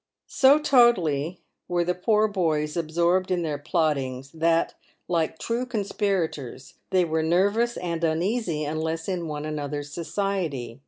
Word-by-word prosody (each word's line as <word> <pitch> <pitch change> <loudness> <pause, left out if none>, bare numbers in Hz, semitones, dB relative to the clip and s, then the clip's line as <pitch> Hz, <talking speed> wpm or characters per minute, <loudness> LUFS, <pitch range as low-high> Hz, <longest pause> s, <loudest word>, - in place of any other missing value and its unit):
So 270 +2 +6
totally 185 - +3 0.3
were 175 -1 +1
the 180 +1 0
poor 215 +4 +2
boys 155 -7 -1
absorbed 170 +3 +1
in 180 -2 0
their 150 -3 -2
plottings, 140 -5 -1
that, 165 +1 +1 0.3
like 165 -2 0
true 235 +6 -2
conspirators, 195 - -2 0.2
they 185 -2 +3
were 160 -1 0
nervous 200 +9 +2
and 170 -2 -3
uneasy 170 0 0
unless 160 +2 -3
in 180 -4 -2
one 150 -1 -4
another's 145 -1 -4
society. 170 - -3
170 Hz, 130 wpm, -25 LUFS, 155-190 Hz, 0.3 s, So